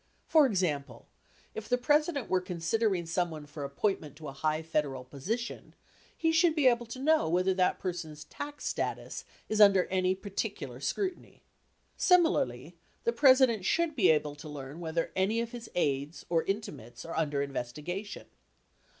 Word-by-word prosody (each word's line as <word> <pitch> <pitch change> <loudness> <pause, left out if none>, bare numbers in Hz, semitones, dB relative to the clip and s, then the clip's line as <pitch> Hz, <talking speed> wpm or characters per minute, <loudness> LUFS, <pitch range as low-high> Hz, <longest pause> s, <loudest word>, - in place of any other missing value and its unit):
For 310 -3 +5
example, 150 - -2 0.5
if 215 -1 -7
the 250 - +3
President 295 +1 +1
were 185 -1 +1
considering 180 +2 0
someone 165 -2 -2
for 145 0 -8
appointment 145 +1 -2
to 155 +1 -9
a - - -8
high 155 +3 -1
Federal 145 -5 -1
position, 190 - -5 0.4
he 325 -1 +2
should 325 0 +4
be 300 -4 +2
able 240 -2 +4
to 230 - -7
know 305 - +2
whether 180 +3 +2
that 185 -1 +2
person's 165 -5 -5
tax 290 - -8
status - - -3 0.2
is 215 0 +1
under 195 -3 +7
any 185 0 +2
particular 195 - -5
scrutiny. 375 - -3 0.5
Similarly, 175 - +2 0.3
the 235 - +1
President 255 -5 +5
should 330 - +1
be 215 -8 +4
able 150 -2 +2
to 150 +1 -9
learn 145 +1 -8
whether 165 0 -2
any 195 +5 +1
of 235 0 -3
his 240 -2 -8
aides 145 -1 -1
or 165 -1 +3
intimates 150 - -5
are 165 - -6
under 145 -3 0
investigation. 150 - -5
185 Hz, 155 wpm, -30 LUFS, 150-235 Hz, 0.5 s, under